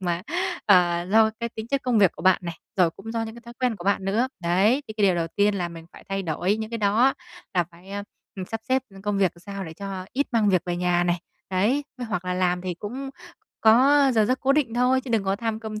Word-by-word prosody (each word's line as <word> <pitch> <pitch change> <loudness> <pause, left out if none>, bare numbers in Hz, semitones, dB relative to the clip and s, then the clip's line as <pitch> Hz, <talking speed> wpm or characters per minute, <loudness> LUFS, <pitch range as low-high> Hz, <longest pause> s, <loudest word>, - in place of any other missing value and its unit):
mà, 175 -1 -1 0.4
ờ, 175 -3 +4
do 220 0 +5
cái 235 - -1
tính 220 -1 -7
chất 275 -1 0
công 245 -4 +2
việc 195 -5 +5
của - - -11
bạn 190 -1 +5
này, 170 -1 -4 0.2
rồi 175 -3 +4
cũng 225 +7 -9
do 230 -1 -1
những 220 0 -6
cái 235 - -11
thói 235 0 -11
quen 245 -4 +1
của 175 - -10
bạn 200 -1 +1
nữa. 225 +7 +1
Đấy, 195 +11 +3
thì 220 - -5
cái 210 - +2
điều 185 - +3
đầu 165 -1 -1
tiên 205 0 +3
là 175 -3 -2
mình 165 -1 -11
phải - - -14
thay 195 0 -2
đổi 180 +5 0
những 220 +1 -5
cái 230 - -3
đó, 220 +6 +3 0.4
là 175 -1 +3
phải, 175 +3 -16 0.5
ừm, 185 - -4
sắp 225 +4 -5
xếp 260 0 +2 0.2
công 205 -1 -1
việc 190 -3 +3
làm - - -18
sao 200 0 -6
để 160 - -8
cho 195 -1 -6
ít 280 +2 0
mang 220 -3 +3
việc 185 -3 +3
về 175 0 -1
nhà 175 0 +1
này. 175 -1 0 0.3
Đấy, 220 +10 +1
với 245 - -4
hoặc 180 -4 -3
là 180 0 -1
làm 180 -1 +1
thì 180 -2 -3
cũng 255 +9 -6 0.5
có 270 +5 +6
giờ 220 -1 +4
giấc 255 +4 0
cố 275 0 +3
định 275 -6 +1
thôi 250 +2 +3
chứ 255 -2 -9
đừng 220 -4 +1
có 195 +1 0
tham 225 0 -3
công 215 -1 -6
205 Hz, 265 wpm, -25 LUFS, 180-230 Hz, 0.5 s, có